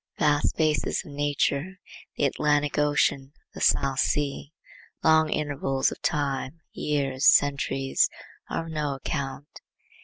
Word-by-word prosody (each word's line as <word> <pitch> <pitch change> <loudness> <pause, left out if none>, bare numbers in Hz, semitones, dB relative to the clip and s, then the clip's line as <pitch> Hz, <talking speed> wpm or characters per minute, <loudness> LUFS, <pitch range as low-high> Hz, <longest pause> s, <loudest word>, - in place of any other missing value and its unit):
Vast 150 -1 +2
spaces 155 +4 0
of 150 - -11
nature, 145 +4 -1 0.4
the - - +2
Atlantic 145 +1 +1
Ocean, 145 -2 +1 0.2
the - - -9
South 135 -1 +2
Sea; 145 0 -1 0.5
long 160 0 +4
intervals 140 -3 0
of - - -9
time, 145 +2 -2
years, 140 -3 0
centuries, 140 -1 +3 0.4
are 165 - -3
of 165 - -8
no 150 -3 -2
account. 140 +1 -5
145 Hz, 120 wpm, -26 LUFS, 140-150 Hz, 0.5 s, long